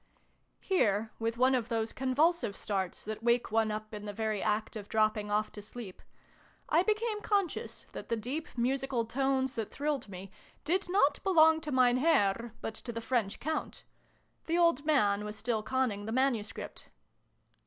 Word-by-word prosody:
Here, 220 - +1
with 230 +1 -1
one 255 +2 +4
of 245 -2 0
those 225 -1 -1
convulsive 270 - +1
starts 190 -4 -3
that 215 +1 -5
wake 235 0 +2
one 225 0 +2
up 215 +1 -5
in 210 0 -6
the 205 - -5
very 215 -1 -1
act 215 +1 -1
of 205 -2 -7
dropping 215 -1 +1
off 210 +1 0
to 205 - -9
sleep, 205 -2 -9 0.7
I 325 - +5
became 430 +1 0
conscious 400 -6 -1
that - - -8
the 230 - +1
deep 260 +9 -3
musical 260 0 0
tones 265 +2 0
that 225 -5 -3
thrilled 290 -5 -2
me 190 0 -9 0.3
did 360 +4 +1
not 360 -6 +3
belong 320 -4 +5
to 300 -1 -5
Mein 250 -2 +4
Herr, 235 -6 +2
but 225 - -4
to 235 +2 -7
the 230 - -4
French 225 -3 -1
Count. 315 +2 -3 0.6
The 335 +1 +1
old 335 -5 +3
man 210 -9 +3
was 210 0 -5
still 220 0 -1
conning 220 -4 -1
the - - -3
manuscript. 240 -4 -1
235 Hz, 170 wpm, -31 LUFS, 215-290 Hz, 0.7 s, I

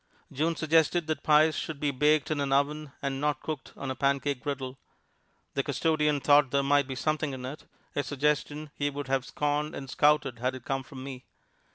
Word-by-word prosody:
June 160 +4 0
suggested 160 +2 +2
that 155 0 -2
pies 155 +1 +5
should 155 -3 -4
be 145 -1 +1
baked 150 +3 +2
in 155 - 0
an 140 -1 -1
oven 145 +1 +1
and 135 0 -2
not 150 -2 +1
cooked 155 -4 -6
on 135 - -4
a - - -3
pancake 140 0 0
griddle. 135 -2 -4 0.7
The 140 - +1
custodian 150 +1 +1
thought 145 -1 +5
there 140 +1 +1
might 140 0 +3
be 135 - -4
something 155 +1 -1
in 130 -1 -6
it 140 +4 -8 0.3
a 145 - +2
suggestion 150 +1 -1
he 145 0 -1
would 145 -1 -6
have 135 -1 +1
scorned 150 +1 -1
and 135 - -6
scouted 145 -3 +2
had 125 +2 -1
it 130 - -10
come 135 -1 -1
from 135 -2 -10
me. 130 -2 -8
145 Hz, 200 wpm, -29 LUFS, 135-150 Hz, 0.7 s, pies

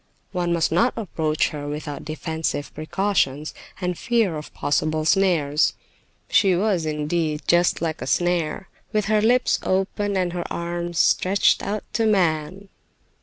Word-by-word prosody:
One 175 -2 -1
must 170 -2 +1
not 210 +10 +2
approach 160 -7 0
her 145 -1 -6
without 145 -1 -5
defensive 160 -1 -3
precautions 155 -3 -1 0.3
and 180 -1 -2
fear 225 -4 +1
of 150 0 -7
possible 155 +1 0
snares. 160 -5 +2 0.5
She 190 -3 +4
was, 185 -4 +1
indeed, 155 0 -1
just 175 0 +2
like 160 -4 -2
a 130 - -4
snare, 175 +2 0 0.2
with 215 -2 0
her 215 +1 +2
lips 245 +3 +3
open 195 +1 -1
and 180 -2 0
her 175 -1 -4
arms 170 0 -3
stretched 190 +4 +3
out 210 +1 -3
to 225 +1 +2
man. 185 -1 0
175 Hz, 140 wpm, -23 LUFS, 155-195 Hz, 0.5 s, She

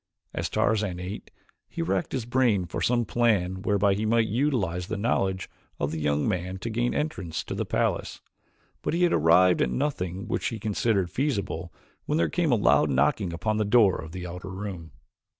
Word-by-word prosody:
As - - -2
Tarzan 105 -5 0
ate 90 +3 -6 0.4
he - - -3
racked 95 +2 -1
his 130 -4 -2
brain 120 -6 +2
for - - -5
some 120 -1 +2
plan 100 -7 +1
whereby 100 0 +2
he 105 +2 -2
might 115 +1 +3
utilize 110 - 0
the 110 - -3
knowledge 95 -4 0 0.3
of 70 - -1
the 80 - -3
young 75 -1 +1
man 90 -1 -2
to 115 +5 -5
gain 120 +2 0
entrance 95 - -3
to - - -5
the - - -3
palace, - - -1 0.6
but - - -1
he 175 - +2
had 175 - +3
arrived 85 +3 +5
at - - +2
nothing 100 - -2
which 110 - -1
he 115 - -3
considered 105 -3 0
feasible 100 - -2 0.4
when 150 - +1
there - - +2
came 170 -5 +1
a - - +5
loud 75 -8 +4
knocking 70 +6 +1
upon 105 +6 -1
the 110 - +2
door 105 -2 +4
of 80 0 -9
the 90 0 -6
outer 90 +1 -7
room. 95 -4 -6
100 Hz, 190 wpm, -26 LUFS, 90-115 Hz, 0.6 s, arrived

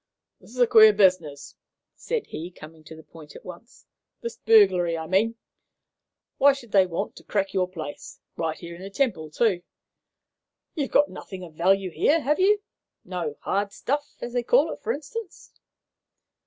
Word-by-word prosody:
"This - - -19
is 250 - -13
a 245 - +6
queer 220 -2 +7
business," 180 -8 +1 0.4
said 475 -3 -3
he, 165 +3 -7
coming 160 -2 -14
to 160 - -11
the 160 - -13
point 155 -2 -15
at - - -13
once 180 +7 -12 0.4
"this 470 0 -5
burglary, 180 - +4
I 160 - -5
mean. 200 +7 +1 1.0
Why 280 +1 +6
should 250 -5 -11
they 190 -2 +5
want 180 +4 -4
to - - -13
crack 195 -2 -2
your 185 -2 +1
place, 155 -5 -8 0.2
right 160 -1 -2
here 170 -1 -9
in 175 - -12
the 195 - -7
Temple, 195 - -1
too? 190 +2 +1 1.1
You've 290 -5 -2
got 290 - +3
nothing 190 -2 -9
of 165 -3 -11
value 185 +3 +1
here, 310 - +2
have 300 +3 0
you? 410 +2 +3 0.4
No 175 -5 -4
'hard 200 0 -1
stuff,' 290 +7 -3
as 240 - -6
they 245 - +1
call - - +3
it, - - -13
for - - -2
instance?" 360 +6 -7
195 Hz, 175 wpm, -25 LUFS, 170-275 Hz, 1.1 s, queer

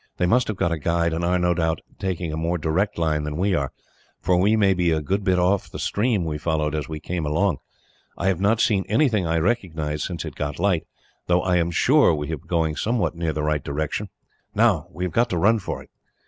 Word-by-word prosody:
They 90 - +1
must 125 +7 +3
have 110 - -3
got 85 - +1
a 85 - -1
guide, 85 +1 +1
and 85 +1 -2
are, 90 +1 +2
no 90 0 +2
doubt, 80 -2 -1 0.2
taking 90 -4 -2
a - - -2
more 85 +2 -1
direct 85 +6 0
line 80 -2 +1
than 75 0 -4
we 95 +3 +1
are, 70 -6 0 0.5
for 90 - +1
we 100 +5 +3
may 100 -3 +4
be 90 -2 +1
a 80 -1 +2
good 95 +7 -1
bit 95 -2 +2
off 90 +2 +1
the - - -8
stream 105 -4 0
we 75 -2 -3
followed 75 -1 -1
as 75 -1 -3
we 80 -1 -5
came 85 +1 -3
along. 75 +1 +1 0.6
I - - -3
have 95 -2 +1
not 110 +3 +3
seen 100 -5 +2
anything 110 - +2
I 80 0 +1
recognise, 80 -6 -1
since 85 -4 -4
it - - -6
got 75 0 -4
light, 90 -2 +1 0.4
though 90 0 +2
I 90 -1 +2
am 85 -1 +1
sure 125 - +4
we 75 -1 -4
have - - -3
been - - -24
going 80 -3 0
somewhere 115 +1 0
near 85 -1 -2
the 75 0 -3
right 75 -2 0
direction. 75 +1 -3 0.5
Now, - - +3
we 90 +3 -6
have 90 -3 -2
got 120 +1 +2
to 90 - -1
run 110 +6 +4
for 95 - -5
it." - - -24
85 Hz, 245 wpm, -23 LUFS, 80-95 Hz, 0.6 s, may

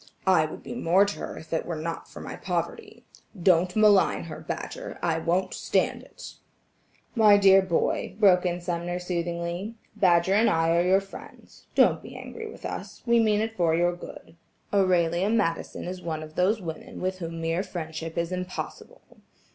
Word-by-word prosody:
I 180 -5 +4
would - - -10
be - - -7
more 195 -4 +3
to 205 - -5
her - - -6
if 160 - -9
it 160 - -1
were 170 - -3
not 165 +1 -5
for - - -10
my - - -7
poverty. 430 -2 -4 0.3
Don't 180 0 +3
malign 210 -3 +4
her, - - -8
Badger, - - -6
I 165 -1 +1
won't 175 +3 0
stand - - 0
it." - - -12 0.8
"My 215 -3 +6
dear 195 -1 +6
boy," 185 0 -1
broke 185 -4 +5
in 175 -1 -1
Sumner, 175 0 -3
soothingly, 175 +3 -3 0.2
"Badger 175 0 +3
and 220 +3 +4
I 165 0 +2
are 170 - +4
your 185 +2 +3
friends. 195 0 -14
Don't - - +4
be - - -11
angry 450 -1 -8
with - - -11
us; - - -7
we 235 -1 +4
mean 215 -2 +3
it 225 0 -3
for 170 -4 +2
your 175 +1 +2
good. 175 - -11 0.4
Aurelia 180 -1 +2
Madison 205 -7 -1
is 180 +1 -6
one 160 -2 -4
of 155 0 -11
those 190 +6 +2
women 160 -2 -7
with 185 0 -2
whom 165 -1 -5
mere 165 +2 0
friendship 165 -3 -6
is 170 +1 -1
impossible. 185 - -6
180 Hz, 180 wpm, -26 LUFS, 170-200 Hz, 0.8 s, My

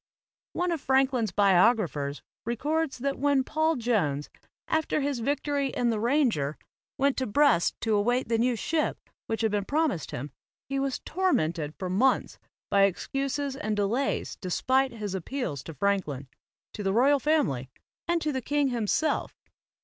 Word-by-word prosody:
One 355 0 0
of 325 -4 -2
Franklin's 260 -5 +2
biographers 180 - +2 0.2
records 295 +6 -1
that 275 +2 -2
when 280 -1 +3
Paul 315 +4 +1
Jones, 190 - 0 0.4
after 315 -1 +1
his 280 -3 -1
victory 285 +2 0
in 240 -2 0
the 220 - -1
"Ranger" 230 - +1 0.4
went 275 0 +2
to 260 - -1
Brest 245 -6 +3
to 225 - +1
await 240 +5 +1
the 230 0 +1
new 245 +1 +2
ship 310 +8 -1 0.3
which 225 - -2
had 220 -2 +1
been 205 -1 0
promised 285 - 0
him, 140 +3 -5 0.4
he 275 0 -1
was 270 -1 -1
tormented 165 - 0
for 185 - -4
months 230 +9 +1 0.3
by 200 0 +6
excuses 275 +8 -2
and 215 -5 -2
delays 215 +7 -1
despite 260 +8 +1
his 210 -4 -5
appeals 190 - -3
to 165 - -7
Franklin, 150 -6 -1 0.5
to 210 - -6
the 195 -1 0
royal 275 +6 +4
family 260 - +1 0.4
and 340 -1 +1
to 305 - 0
the 260 -2 -2
king 285 +2 +1
himself. 245 +6 0
245 Hz, 155 wpm, -27 LUFS, 200-280 Hz, 0.5 s, by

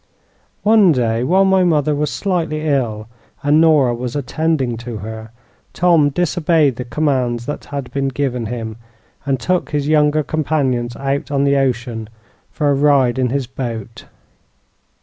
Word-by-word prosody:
"One 210 -4 +5
day, 115 -2 0
while 190 +8 +3
my 190 -1 +3
mother 155 -4 +2
was 150 0 -1
slightly 165 -6 -2
ill 115 -7 -1 0.4
and 145 +2 +4
Nora 150 -7 +4
was 120 +1 -5
attending 145 -2 -1
to 120 -1 -6
her, 110 +2 -8 0.4
Tom 170 -4 +3
disobeyed 160 -3 +1
the 125 - -5
commands 125 -4 -1
that 145 - -5
had 140 -3 -6
been 140 0 -1
given 130 -4 -2
him, 115 -2 -5 0.5
and 135 -2 0
took 180 +7 -1
his 145 -1 -2
younger 150 0 +3
companions 135 -6 -1
out 140 +1 -2
on 140 -1 +1
the 140 0 +3
ocean 120 -4 -2 0.4
for 145 -2 0
a - - +3
ride 135 -3 +3
in 125 -1 +1
his 135 +1 -1
boat. 115 -3 -6
140 Hz, 150 wpm, -18 LUFS, 120-155 Hz, 0.5 s, One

